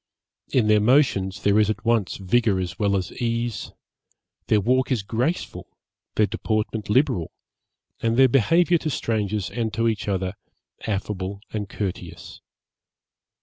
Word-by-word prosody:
In 125 -4 +3
their 105 0 +5
motions 105 -5 +2
there 100 +1 +4
is 105 -1 +3
at 105 0 -3
once 115 -5 +1
vigour 100 +1 +1
as 90 -1 -4
well 100 -2 +2
as 95 - -4
ease; 115 -1 -2 0.8
their 110 - +4
walk 125 +6 +1
is 115 -6 +1
graceful, 120 - -2 0.5
their 110 - +4
deportment 110 0 -2
liberal, 105 - +2 0.7
and 115 0 +1
their 135 0 +7
behaviour 165 - +3
to 155 - -3
strangers 105 -6 -2
and 115 0 -2
to 115 +1 +1
each 110 -3 -1
other, 95 -2 -1 0.5
affable 100 -1 -3
and 105 -2 -3
courteous. 100 -4 -6
110 Hz, 140 wpm, -24 LUFS, 100-120 Hz, 0.8 s, their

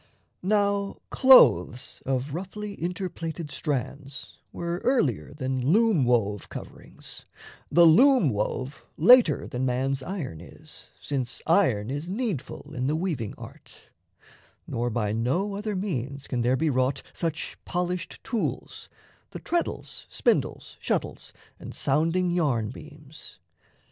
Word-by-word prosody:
Now, 200 0 +1
clothes 260 - +5
of 135 +1 -1
roughly 200 +4 -5
inter 180 +2 -2
plaited 165 -3 -6
strands 140 0 -4
Were 170 +1 -4
earlier 135 - +1
than 130 -3 -3
loom 215 - +4
wove 105 -4 +1
coverings; - - -9 0.5
The 170 0 +7
loom 220 - +6
wove 125 +6 -3
later 215 - +6
than 125 +1 -4
man's 130 +2 0
iron 135 - -5
is, 155 - -12
Since 130 -4 -3
iron 130 - +2
is 145 +5 -4
needful 190 - -4
in 130 -2 -2
the 150 - +1
weaving 155 - -3
art, - - -13 0.7
Nor 120 +1 -2
by 105 -3 -1
no 170 - 0
other 210 0 -3
means 140 - -3
can 125 -2 -2
there 125 +2 +2
be 155 +2 +1
wrought 130 +1 0
Such 165 -1 -3
polished 180 -1 -3
tools 230 -4 -4 0.4
the - - -8
treadles, 345 0 -3
spindles, - - -1
shuttles, - - -3 0.3
And - - -9
sounding 165 +5 +1
yarn 135 -11 0
beams. 150 +1 -12
150 Hz, 125 wpm, -26 LUFS, 130-185 Hz, 0.7 s, The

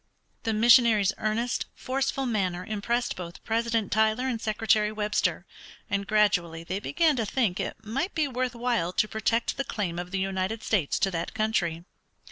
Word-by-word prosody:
The 225 - +1
missionary's 220 -3 +5
earnest, 230 +3 -1
forceful 270 +1 -1
manner 185 -6 -1
impressed 235 +4 -1
both 175 0 -8
President 230 -1 0
Tyler 220 +4 +2
and 235 -4 -2
Secretary 215 -1 +2
Webster, 210 0 -1 0.5
and 200 -1 -1
gradually 180 -6 +2
they 185 +4 -3
began 310 +7 +2
to 225 - 0
think 210 -6 0
it 220 - -5
might 270 - -2
be 310 -3 +1
worth 255 -1 -2
while 235 -7 0
to 215 - +2
protect 225 +2 0
the 275 - 0
claim 185 -9 -3
of 175 0 -5
the 190 - -2
United 190 +3 -2
States 185 -10 +1
to 195 - +1
that 165 +4 -4
country. 185 -7 0
215 Hz, 165 wpm, -27 LUFS, 195-235 Hz, 0.5 s, missionary's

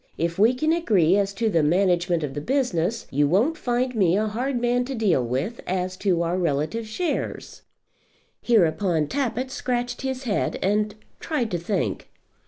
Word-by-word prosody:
If 170 +2 -2
we 230 +5 +5
can 310 +5 +1
agree 195 - +3
as 200 -1 +1
to 225 +2 0
the 170 -7 +2
management 175 +1 +2
of 140 -2 -3
the 145 - -4
business, 230 - 0
you 145 +1 +2
won't 220 - +2
find 250 -2 -1
me 190 -5 +3
a 215 - +1
hard 245 +4 -2
man 245 +1 +1
to 265 +1 -4
deal 195 - +2
with 135 - -3
as 185 0 -2
to 180 -4 +1
our 170 +2 -1
relative 170 +7 -1
shares." 335 +11 -3 0.8
Hereupon 175 -6 +2
Tappitt 260 - -2
scratched 245 -1 -2
his 265 -1 -3
head, 220 -5 -1
and 210 +1 +1 0.2
tried 270 -9 -2
to 175 - -1
think. 190 +4 -2
205 Hz, 170 wpm, -24 LUFS, 170-245 Hz, 0.8 s, we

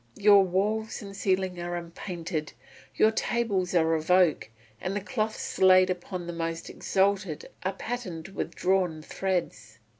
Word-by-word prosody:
Your 205 -1 +7
walls 210 +5 -1
and 200 -1 -9
ceiling 185 -2 0
are 175 0 -3
unpainted, 170 -2 -5 0.4
your 220 - +5
tables 215 -6 -1
are 165 -1 +3
of 160 +1 -2
oak, 180 -9 +4 0.3
and 190 +2 -2
the - - 0
cloths 215 +1 -3
laid 185 0 +6
upon 180 0 -5
the 175 - -5
most 165 0 -4
exalted 190 -4 0
are 190 +1 -1
patterned 195 -7 -5
with 195 - -5
drawn 180 -4 +1
threads. 165 - -3
185 Hz, 145 wpm, -28 LUFS, 170-200 Hz, 0.4 s, Your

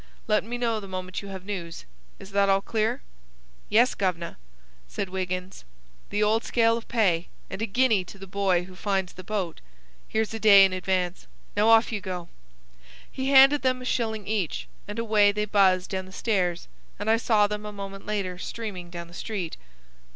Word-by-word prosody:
Let 215 -1 +2
me 240 +3 -4
know 230 -2 0
the 200 - -9
moment 185 -1 -5
you 200 - -9
have 190 -1 -8
news. 175 - -6 0.3
Is 190 - -12
that 200 0 +3
all 195 0 +4
clear?" 220 - -1 0.7
"Yes, 240 +4 +4
guv'nor," 180 -4 -2 0.5
said 190 - -4
Wiggins. 185 0 -4 0.5
"The 210 +1 +1
old 220 +2 +2
scale 230 -1 +3
of 230 - -6
pay, 185 -8 +1 0.2
and 195 - -5
a 225 - 0
guinea 225 -2 +3
to 195 - -12
the 195 - -9
boy 190 -2 +1
who 185 +1 -12
finds 190 -1 -1
the 185 - -10
boat. 190 -4 -3 0.5
Here's 220 0 -1
a 225 - -4
day 200 -3 +8
in 190 - 0
advance. 185 -1 -1 0.3
Now 210 +2 +3
off 225 +1 +5
you 210 -2 -3
go!" 180 -3 -5 0.8
He 265 0 -2
handed 275 +1 +7
them 255 -1 +1
a 250 - -8
shilling 220 -4 -1
each, 180 - -2 0.2
and 205 - -6
away 215 -3 +4
they 210 +1 -1
buzzed 190 -3 +3
down 190 -1 -3
the - - -13
stairs, 185 -4 -1 0.3
and - - -5
I 225 +1 +4
saw 220 -2 +3
them 210 0 -3
a 210 - -6
moment 195 -1 -8
later 195 -4 -2
streaming 190 -5 -6
down 170 -1 -7
the 170 - -16
street. 185 -3 -4
200 Hz, 190 wpm, -26 LUFS, 185-220 Hz, 0.8 s, day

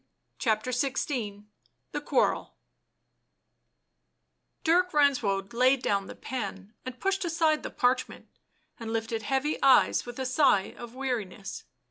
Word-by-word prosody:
CHAPTER 220 0 0
XVI 245 -5 -2 0.5
THE - - -3
QUARREL - - 0 2.1
Dirk 360 +2 +3
Renswoude 240 -9 +2
laid 255 +2 +3
down 200 -1 0
the - - -9
pen 200 -4 -6
and 255 -1 -7
pushed 390 0 0
aside 325 -2 +1
the - - -5
parchment, 250 0 0 0.5
and 225 -1 -5
lifted 225 0 -2
heavy 270 +6 -1
eyes 265 -2 +5
with 240 - -7
a 265 - -2
sigh 255 -7 +3
of 240 0 -10
weariness. 225 -7 -4
250 Hz, 120 wpm, -28 LUFS, 215-275 Hz, 2.1 s, eyes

